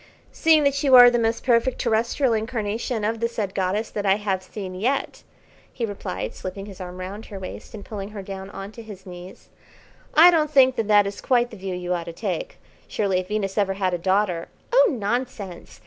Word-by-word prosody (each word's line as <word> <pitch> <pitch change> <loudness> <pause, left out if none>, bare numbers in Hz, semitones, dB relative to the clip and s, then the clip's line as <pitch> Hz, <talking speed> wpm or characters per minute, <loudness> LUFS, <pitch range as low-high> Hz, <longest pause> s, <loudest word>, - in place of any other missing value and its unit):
"Seeing 315 -2 +4
that 280 0 +1
you 270 -3 +5
are 245 -1 +10
the 240 - +1
most 225 0 0
perfect 245 +1 +2
terrestrial 235 +3 +1
incarnation 220 0 -2
of 225 +2 -1
the 230 - +1
said 210 -4 -3
goddess 195 +3 -1
that 205 - -3
I 195 -1 +4
have 200 -2 -2
seen 190 0 -7
yet," 245 +9 -2 0.5
he 240 - -3
replied, 200 -3 -5
slipping 190 +1 -7
his 195 -2 -10
arm 180 0 -7
round 195 +4 -7
her 200 - -8
waist 190 +4 -8
and 205 - -9
pulling 200 -2 -6
her 210 -2 -8
down 195 0 -7
on 195 0 -8
to 230 - -10
his 205 -4 -11
knees, 180 0 -11 0.7
"I 340 +3 +9
don't 310 -3 +2
think 265 -3 +5
that 225 - -1
that 205 -1 +5
is 200 0 -5
quite 245 -2 +2
the - - -9
view 190 -1 -4
you 180 0 -3
ought 170 -1 -3
to 170 - -7
take. - - -4 0.3
Surely 195 -3 0
if 185 - -5
Venus 205 -1 -2
ever 195 -1 +1
had 190 -2 -1
a 175 - -1
daughter 185 -2 0
" - - -23
"Oh, - - +6
nonsense! 220 -5 -4
210 Hz, 215 wpm, -23 LUFS, 190-235 Hz, 0.7 s, are